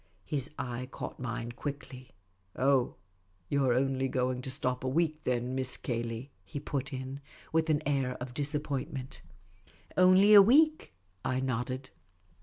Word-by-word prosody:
His 145 -1 -1
eye 125 0 -4
caught - - -7
mine 120 -1 -4
quickly. 130 -1 -7 0.3
" 95 0 -42
Oh, 130 -1 +2 0.5
you 140 -1 +2
're 130 -2 +3
only 135 0 +1
going 125 -1 -1
to 130 - -6
stop 130 -1 -2
a - - -1
week, 155 +2 +1
then. 125 0 0
Miss 130 -1 -1
Cay 115 -2 -2
ley? 120 +4 -5
" 95 - -38
he 100 +9 -6
^^ut 140 0 -3
in, 130 +1 -5 0.3
with 160 0 +2
an 155 0 +2
air 135 -3 0
of 125 0 -6
disappointment. 140 -1 -3 0.4
" - - -34 0.3
Only 185 +3 +6
a 205 - +12
week," 305 - +4 0.3
I 130 0 0
nodded. 130 +1 -3
130 Hz, 165 wpm, -31 LUFS, 125-145 Hz, 0.5 s, a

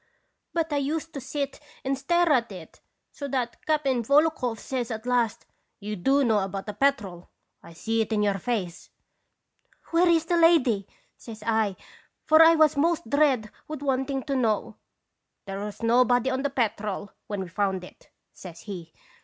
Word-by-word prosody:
But 325 -2 -1
I - - +1
used 310 +4 -2
to 275 - -6
sit 280 +2 -4 0.3
and 270 +1 +1
stare 340 +5 +2
at 235 -5 +1
it 180 -4 -11 0.3
so 285 - -6
that 250 -3 -3
Cap'n 280 -5 +1
Volokhoff 280 -3 +2
says 250 -1 -4
at 220 0 -5
last: 240 -2 0
" - - -46
* - - -52
You 210 0 -5
do 270 +10 +2
know 220 -4 +3
about 195 0 -4
the 210 - -5
Petrel; 205 -8 -1 0.3
I 170 - -14
see 225 +6 -1
it 220 - -3
in 210 -1 +1
your 200 -1 +1
face.' 185 -5 -3 0.5
'" - - -32
Where 340 +1 +4
is 325 -2 +3
the 345 +1 +1
lady?' 260 - +4 0.3
says 220 -2 -10
I, 220 -3 +1 0.5
for 315 0 +5
1 325 0 +8
was 310 -2 +4
most 335 +3 0
dead 275 -7 +2 0.2
with 305 -2 -6
wanting 270 0 -1
to 280 -2 -2
know. 225 -5 0 0.2
" - - -55
' - - -55
There 195 -1 -5
was 210 +2 -7
nobody 245 +2 +3
on 260 0 -1
the 285 - 0
Petrel 210 -6 -2 0.2
when 205 -2 -3
we 190 - -5
found 190 +1 -1
it,' 180 - -15 0.2
says 175 -3 -11
he. 175 -5 -8
245 Hz, 185 wpm, -26 LUFS, 210-285 Hz, 0.5 s, 1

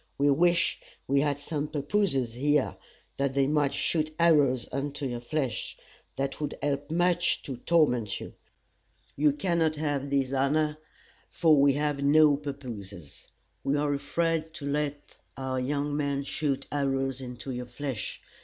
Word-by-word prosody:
We 145 +1 +4
wish 175 +4 +3 0.3
we 140 +1 +3
had 145 -1 +1
some 145 0 -3
pappooses 145 - 0
here, 145 +3 +1 0.4
that 140 -1 0
they 140 -1 +4
might 145 -1 +2
shoot 155 -1 0
arrows 145 -7 +4
into 140 +1 -3
your 120 -2 -3
flesh. 130 -1 -3 0.4
That 135 +2 -3
would 150 -1 -3
help 145 0 -2
much 175 +1 +2
to 135 -3 -5
torment 125 - +2
you. - - -8 0.8
You 150 +1 +4
cannot 160 +1 +1
have 145 -2 -2
this 135 -1 0
honor, 150 +3 +1 0.5
for 160 -3 +4
we 140 0 +5
have 145 0 -1
no 150 +1 +6
pappooses. 115 - -8 0.4
We 140 +2 +1
are 145 0 +1
afraid 160 +2 -1
to 145 - -7
let 145 0 -3 0.2
our 130 -1 -2
young 145 +2 -1
men 140 -1 -1
shoot 140 -1 -2
arrows 135 -2 -1
into 125 +1 -6
your 125 -1 -5
flesh. 125 -2 -5
145 Hz, 145 wpm, -28 LUFS, 135-150 Hz, 0.8 s, no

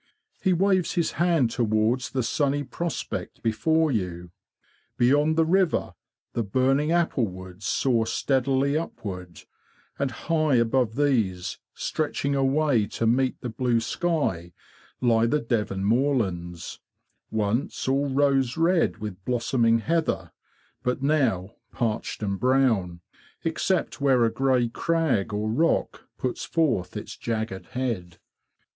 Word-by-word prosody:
He 190 - +2
waves 185 0 +2
his 170 -3 0
hand 165 -8 +2
towards 115 +2 +1
the 130 -2 -1
sunny 145 +4 0
prospect 170 +3 -5
before 160 +8 +2
you. 90 -6 -3 0.7
Beyond 145 +5 +3
the 165 0 +3
river 185 0 +1 0.4
the 120 - 0
burning 130 +8 +1
apple 165 -8 +2
woods 95 +1 -8
soar 115 -2 +1
steadily 135 +3 +1
upward; 90 - -5 0.6
and 140 -1 +1
high 155 +3 0
above 115 -1 +2
these, 115 -11 0 0.2
stretching 145 -2 -2
away 135 -4 +2
to 115 - -3
meet 130 +3 +1
the 125 - -4
blue 120 +1 +1
sky, 115 - -1 0.5
lie 115 -2 +3
the 150 - +2
Devon 105 -5 -1
moorlands, 100 - 0 0.5
once 110 +6 -1
all 140 +2 +1
rose 135 -1 +2
red 165 -5 +2
with 105 -4 -7
blossoming 115 -1 +2
heather, 155 - -1 0.5
but 125 +2 -2
now, 130 -10 +1
parched 115 -1 -2
and 100 -2 -2
brown, 120 -10 +2 0.4
except 165 0 -1
where 130 -4 +4
a 115 - +1
grey 130 -1 +2
crag 150 - 0
or 105 +1 -2
rock 130 +10 0
puts 125 - -3
forth 125 - 0
its - - -7
jagged 110 -4 -4
head. 110 -10 -3
125 Hz, 125 wpm, -25 LUFS, 110-145 Hz, 0.7 s, where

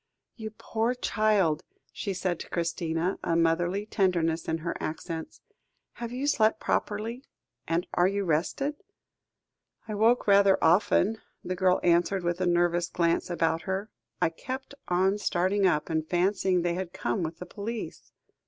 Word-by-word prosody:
"You 220 -2 -6
poor 230 +3 -1
child," 205 -9 +1 0.3
she 200 - -3
said 180 -2 -1
to - - -8
Christina, 170 +1 -1
a 165 - +1
motherly 175 +4 +1
tenderness 170 -6 +1
in 160 - 0
her 170 - -1
accents; 160 +1 -5 0.5
"have 235 0 -6
you 255 +3 -3
slept 220 -6 +3
properly; 225 +5 -2 0.4
and 165 +2 0
are 175 - +4
you 200 +1 -1
rested?" 190 - 0 1.1
"I 215 - -4
woke 225 +4 +3
rather 200 -1 +5
often," 195 +5 +3 0.2
the 185 - -3
girl 185 0 +3
answered 175 +2 +2
with 175 +1 -1
a 185 - +2
nervous 175 0 +2
glance 170 0 +1
about 165 -1 +1
her. 195 +3 -2 0.3
"I - - +3
kept 260 +10 -6
on 190 +3 +2
starting 190 +1 +2
up, 150 -4 +1
and 160 -1 0
fancying 185 +1 +1
they 175 -1 +1
had 180 0 -4
come 190 +1 -1
with 165 0 -3
the 180 - -7
police." 215 +5 -6
185 Hz, 155 wpm, -28 LUFS, 170-205 Hz, 1.1 s, rather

